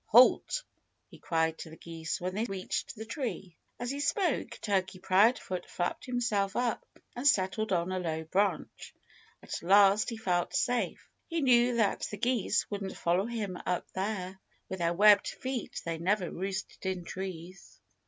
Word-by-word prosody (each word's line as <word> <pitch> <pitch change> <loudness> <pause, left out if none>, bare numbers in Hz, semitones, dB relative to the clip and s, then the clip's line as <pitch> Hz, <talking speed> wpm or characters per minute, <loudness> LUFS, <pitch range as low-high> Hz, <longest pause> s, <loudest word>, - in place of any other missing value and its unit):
"Halt!" 255 - +5 0.5
he - - -13
cried 160 -1 0
to 160 - -7
the 160 - -12
geese 165 -1 -5
when 185 +1 -3
they 215 +4 -1
reached 195 +1 -3
the 220 0 -7
tree. 225 - -5 0.2
As 245 +1 -2
he 280 - -4
spoke, 290 - 0
Turkey 190 -3 -1
Proudfoot 185 -1 +2
flapped 175 - -2
himself 225 -6 0
up 240 -2 0 0.3
and 250 +4 0
settled 205 -2 +2
on 175 0 +1
a 185 - -1
low 160 -2 -2
branch. 185 +1 -1 0.5
At - - -5
last 200 +4 +5
he 230 - -5
felt 180 -5 0
safe. 245 -1 0 0.2
He 335 -1 -1
knew 245 -2 +4
that 220 -4 +1
the 210 - -6
geese 235 -2 +1
wouldn't 200 -2 -4
follow 180 +5 +1
him 210 -6 -4
up 180 - -2
there. 190 -1 -3 0.3
With 190 - -4
their 170 0 +1
webbed 205 +1 +6
feet 255 -3 -4
they 165 -1 -3
never 185 +1 0
roosted 190 +2 -5
in 185 -2 -2
trees. 185 -1 -7
195 Hz, 165 wpm, -30 LUFS, 180-235 Hz, 0.5 s, webbed